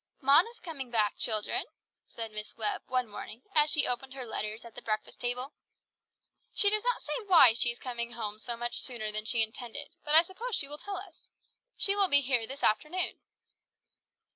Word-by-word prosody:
"Mona 290 Hz, -, +5 dB
is 475 Hz, -, -16 dB
coming 280 Hz, -7 st, -7 dB
back, 215 Hz, -3 st, +1 dB
children," 215 Hz, -2 st, 0 dB, 0.4 s
said 225 Hz, -1 st, -7 dB
Miss 210 Hz, +1 st, -7 dB
Webb 215 Hz, -2 st, -2 dB
one 255 Hz, -1 st, 0 dB
morning 220 Hz, +3 st, -9 dB
as 300 Hz, 0 st, +5 dB
she 295 Hz, -, +4 dB
opened 260 Hz, +2 st, -1 dB
her 260 Hz, -2 st, -6 dB
letters 220 Hz, 0 st, -5 dB
at 230 Hz, -, -12 dB
the -, -, -10 dB
breakfast 215 Hz, -1 st, -4 dB
table. 250 Hz, +3 st, -3 dB, 1.0 s
"She 405 Hz, -1 st, +6 dB
does 425 Hz, 0 st, +2 dB
not -, -, 0 dB
say -, -, -4 dB
why 325 Hz, -, +8 dB
she 240 Hz, +1 st, +3 dB
is 235 Hz, -, -3 dB
coming 235 Hz, -2 st, -4 dB
home 215 Hz, -2 st, -5 dB
so 235 Hz, +1 st, -3 dB
much 240 Hz, 0 st, -1 dB
sooner 225 Hz, -4 st, -2 dB
than 215 Hz, 0 st, -3 dB
she 230 Hz, 0 st, +3 dB
intended, 240 Hz, +5 st, -6 dB
but 295 Hz, +1 st, +2 dB
I 325 Hz, -, +9 dB
suppose 420 Hz, +6 st, -4 dB
she 275 Hz, -, 0 dB
will 295 Hz, +1 st, -6 dB
tell 400 Hz, -1 st, -5 dB
us. 375 Hz, -3 st, -12 dB, 0.5 s
She 395 Hz, -, +2 dB
will 400 Hz, -1 st, +4 dB
be 285 Hz, -4 st, +5 dB
here 245 Hz, -4 st, +1 dB
this 270 Hz, +2 st, -8 dB
afternoon." 305 Hz, +11 st, +1 dB
250 Hz, 195 wpm, -30 LUFS, 225-310 Hz, 1.0 s, I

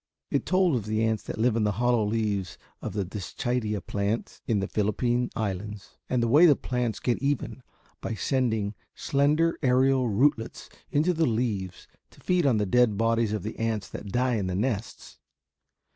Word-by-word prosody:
It -, -, 0 dB
told 185 Hz, -5 st, +3 dB
of 110 Hz, -4 st, -3 dB
the 110 Hz, +1 st, 0 dB
ants 110 Hz, -1 st, 0 dB
that -, -, -5 dB
live 115 Hz, +1 st, +2 dB
in 115 Hz, -, +1 dB
the 105 Hz, -1 st, +1 dB
hollow 120 Hz, +1 st, +2 dB
leaves 105 Hz, -4 st, -1 dB, 0.2 s
of -, -, -5 dB
the 100 Hz, -2 st, -1 dB
Dischidia 105 Hz, +2 st, -3 dB
plants 100 Hz, +5 st, -3 dB
in 110 Hz, -3 st, +2 dB
the 95 Hz, -, -2 dB
Philippine 120 Hz, +4 st, 0 dB
Islands, 105 Hz, -1 st, -5 dB
and 125 Hz, -2 st, +1 dB
the -, -, +2 dB
way 150 Hz, +9 st, +7 dB
the 145 Hz, -, +6 dB
plants 125 Hz, -4 st, -2 dB
get 120 Hz, -, 0 dB
even 140 Hz, -1 st, -2 dB, 0.4 s
by 115 Hz, -, -3 dB
sending 110 Hz, -3 st, 0 dB, 0.2 s
slender 150 Hz, +4 st, +1 dB
aerial 130 Hz, -1 st, +3 dB
rootlets 115 Hz, +1 st, 0 dB, 0.2 s
into 155 Hz, +5 st, +2 dB
the 160 Hz, -1 st, +1 dB
leaves 110 Hz, -6 st, -2 dB, 0.2 s
to -, -, -21 dB
feed 180 Hz, -4 st, +1 dB
on 125 Hz, -5 st, +3 dB
the 105 Hz, -, +1 dB
dead 120 Hz, 0 st, +3 dB
bodies 115 Hz, 0 st, +1 dB
of 105 Hz, -4 st, -2 dB
the 110 Hz, -, -6 dB
ants 110 Hz, -3 st, -1 dB
that -, -, -8 dB
die 125 Hz, 0 st, +1 dB
in 100 Hz, -3 st, -2 dB
the 90 Hz, -, -2 dB
nests. 110 Hz, 0 st, -3 dB
115 Hz, 180 wpm, -27 LUFS, 105-130 Hz, 0.4 s, way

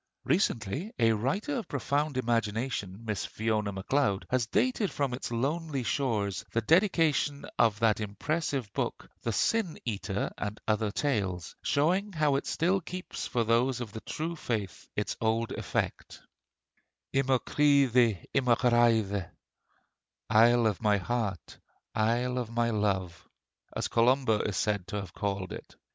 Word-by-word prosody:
Recently, 140 Hz, -, 0 dB
a 115 Hz, -2 st, +4 dB
writer 145 Hz, -, -1 dB
of 230 Hz, -, -4 dB
profound 145 Hz, +1 st, -1 dB
imagination, 115 Hz, -3 st, -1 dB
Miss 105 Hz, -3 st, -2 dB
Fiona 110 Hz, -2 st, -1 dB
Macleod, 100 Hz, +1 st, 0 dB
has 125 Hz, -3 st, +1 dB
dated 230 Hz, -, +1 dB
from 140 Hz, -3 st, -1 dB
its 125 Hz, -, -4 dB
lonely 140 Hz, +3 st, -1 dB
shores 105 Hz, -8 st, -1 dB
the 115 Hz, -, +2 dB
dedication 160 Hz, -, +2 dB
of 110 Hz, -3 st, +4 dB
that 110 Hz, -2 st, +3 dB
impressive 125 Hz, -, -2 dB
book -, -, -3 dB
'The 115 Hz, -, -1 dB
Sin 205 Hz, -, +1 dB
Eater, 100 Hz, -3 st, -2 dB
and 105 Hz, +1 st, -4 dB
Other 110 Hz, 0 st, +1 dB
Tales,' 100 Hz, -, -2 dB
showing 185 Hz, +8 st, +1 dB
how 150 Hz, -3 st, +2 dB
it 140 Hz, -, -2 dB
still 185 Hz, +4 st, +1 dB
keeps 180 Hz, +2 st, -6 dB
for 120 Hz, -, 0 dB
those 120 Hz, +3 st, +2 dB
of 120 Hz, -4 st, -5 dB
the 110 Hz, -, -6 dB
true 165 Hz, +2 st, -4 dB
faith 110 Hz, -, -4 dB
its -, -, -1 dB
old 115 Hz, +1 st, +1 dB
effect: -, -, -3 dB, 1.0 s
"I 135 Hz, -, +5 dB
mo 135 Hz, -1 st, +2 dB
cridhe, 125 Hz, -, +3 dB
i -, -, +6 dB
mo 125 Hz, -3 st, +3 dB
ghraidh," 115 Hz, -6 st, +2 dB, 1.0 s
(Isle 115 Hz, +2 st, +6 dB
of 105 Hz, -5 st, 0 dB
my 105 Hz, -2 st, +3 dB
heart, 100 Hz, -2 st, -3 dB, 0.3 s
isle 120 Hz, +3 st, +1 dB
of 120 Hz, -3 st, -4 dB
my 115 Hz, 0 st, +1 dB
love,) 95 Hz, -6 st, -1 dB, 0.5 s
as -, -, -1 dB
Columba 120 Hz, -2 st, +3 dB
is 100 Hz, -2 st, -2 dB
said 100 Hz, -2 st, 0 dB
to -, -, -5 dB
have 95 Hz, -4 st, -5 dB
called 100 Hz, -2 st, -3 dB
it. -, -, -10 dB
115 Hz, 145 wpm, -29 LUFS, 105-140 Hz, 1.0 s, i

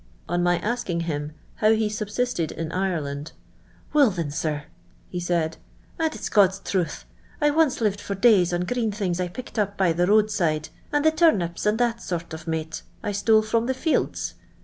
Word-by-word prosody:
On 175 Hz, 0 st, 0 dB
my 175 Hz, 0 st, +3 dB
asking 190 Hz, -3 st, -2 dB
him 150 Hz, -2 st, -3 dB, 0.2 s
how 215 Hz, +1 st, +4 dB
ho 220 Hz, -1 st, +1 dB
sub 210 Hz, 0 st, -3 dB
sisted 210 Hz, -7 st, -1 dB
in 165 Hz, -1 st, -5 dB
Ireland, 160 Hz, -6 st, -2 dB, 0.3 s
*' -, -, -30 dB
Will, 290 Hz, -5 st, +6 dB
thin, 170 Hz, -6 st, -3 dB
sir,"' 150 Hz, -1 st, -2 dB, 0.5 s
he 180 Hz, -, -4 dB
said, 170 Hz, -2 st, 0 dB, 0.4 s
"and 320 Hz, -1 st, +1 dB
it's -, -, -4 dB
(jod's 195 Hz, -2 st, +4 dB
truth, 185 Hz, -5 st, -2 dB, 0.3 s
I 295 Hz, -1 st, +3 dB
once 305 Hz, -5 st, +2 dB
lived 205 Hz, -2 st, +1 dB
for 200 Hz, -, -4 dB
days 195 Hz, -5 st, +5 dB
on 175 Hz, 0 st, 0 dB
green 225 Hz, +4 st, 0 dB
thinzs 190 Hz, -4 st, -2 dB
I 180 Hz, -, 0 dB
picked 235 Hz, +5 st, -6 dB
up 200 Hz, -1 st, 0 dB
by 185 Hz, -4 st, +3 dB
the 175 Hz, +2 st, +1 dB
road 215 Hz, +1 st, +4 dB
side, 155 Hz, -6 st, 0 dB, 0.2 s
and 295 Hz, +1 st, +1 dB
the 315 Hz, -, +6 dB
turnips, 210 Hz, -, +2 dB
<ind 210 Hz, +1 st, +3 dB
that 235 Hz, -1 st, 0 dB
sort 170 Hz, -2 st, -4 dB
of 160 Hz, +1 st, -8 dB
mate 160 Hz, 0 st, -3 dB, 0.2 s
I 210 Hz, -, -1 dB
stole 215 Hz, +2 st, +3 dB
from 225 Hz, +2 st, 0 dB
the 260 Hz, -, 0 dB
fields. 315 Hz, +4 st, 0 dB
195 Hz, 195 wpm, -24 LUFS, 170-225 Hz, 0.5 s, Will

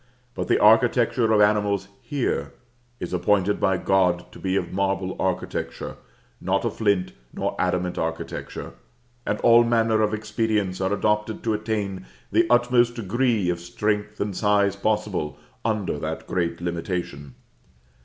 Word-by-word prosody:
But -, -, -4 dB
the -, -, +3 dB
architecture 115 Hz, +1 st, +4 dB
of 105 Hz, -1 st, +5 dB
animals 105 Hz, -2 st, +2 dB
here, 130 Hz, +1 st, -2 dB, 0.5 s
is 90 Hz, -, -5 dB
appointed 100 Hz, +2 st, +2 dB
by 95 Hz, -1 st, +2 dB
God 90 Hz, -2 st, +1 dB
to -, -, -12 dB
be 95 Hz, 0 st, 0 dB
a -, -, +1 dB
marble 95 Hz, -1 st, -2 dB
architecture, 95 Hz, -1 st, -3 dB, 0.5 s
not -, -, 0 dB
a -, -, 0 dB
flint 100 Hz, -4 st, 0 dB, 0.2 s
nor -, -, -3 dB
adamant 90 Hz, 0 st, 0 dB
architecture; 80 Hz, 0 st, -5 dB, 0.5 s
and 105 Hz, -, 0 dB
all 120 Hz, 0 st, +7 dB
manner 115 Hz, -2 st, +2 dB
of 105 Hz, -1 st, +2 dB
expedients 105 Hz, -3 st, -1 dB
are 95 Hz, +1 st, 0 dB
adopted 105 Hz, +1 st, 0 dB
to 110 Hz, -, +1 dB
attain 105 Hz, -3 st, -3 dB, 0.2 s
the 170 Hz, -, +3 dB
utmost 120 Hz, 0 st, +3 dB
degree 115 Hz, -3 st, +1 dB
of 85 Hz, -, -3 dB
strength 105 Hz, +4 st, -2 dB
and 100 Hz, -2 st, -2 dB
size 100 Hz, -1 st, +2 dB
possible 100 Hz, -7 st, -1 dB, 0.3 s
under 110 Hz, -3 st, -1 dB
that -, -, -4 dB
great 85 Hz, -1 st, -2 dB
limitation. 85 Hz, -6 st, -4 dB
105 Hz, 140 wpm, -24 LUFS, 95-110 Hz, 0.5 s, all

